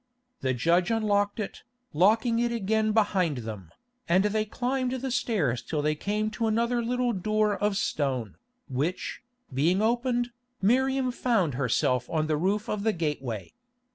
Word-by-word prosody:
The 130 -1 0
judge 170 - +2
unlocked 205 -2 +1
it, 210 - -5 0.3
locking 225 - +3
it 240 0 +1
again 220 -1 +1
behind 195 - +2
them, 100 -7 -7 0.4
and 185 +3 +4
they 215 +1 +1
climbed 255 +3 -1
the 260 0 -3
stairs 200 - 0
till 150 -2 -3
they 150 0 +2
came 210 +7 -2
to 225 +1 -1
another 235 +2 +1
little 245 +1 0
door 215 +2 +1
of 205 0 0
stone, 130 - -1 0.3
which, 150 +6 -2 0.3
being 165 +8 +2
opened, 240 +2 +1 0.3
Miriam 260 +4 +2
found 225 - +1
herself 125 -1 +1
on 155 -1 0
the 155 0 +1
roof 195 +7 0
of 210 - -2
the 220 +1 +1
gateway. 140 - -3
205 Hz, 150 wpm, -27 LUFS, 155-230 Hz, 0.4 s, and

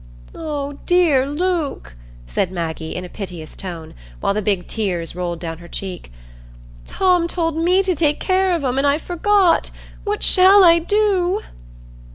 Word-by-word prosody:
"Oh 285 -3 -5
dear, 325 -7 +3
Luke," 310 - -2 0.3
said 175 - -2
Maggie, 160 -2 -4
in 180 - -5
a - - -7
piteous 175 -5 -8
tone, 170 -4 -8 0.3
while - - 0
the 210 - -1
big 195 -3 -1
tears 180 -7 -3
rolled 175 -2 -3
down 165 -1 -6
her 170 - -12
cheek; 180 - -7 0.8
"Tom 360 -3 +2
told 330 -2 -1
me 360 +4 +2
to 380 -1 +1
take 300 -2 +1
care 375 0 +1
of 335 -4 -1
'em, 260 0 0
and 280 - +2
I 285 +1 +3
forgot. 360 +2 +2 0.3
What 415 0 -2
shall 385 +1 +6
I 335 -1 +6
do?" 395 +1 +1
295 Hz, 160 wpm, -20 LUFS, -, 0.8 s, shall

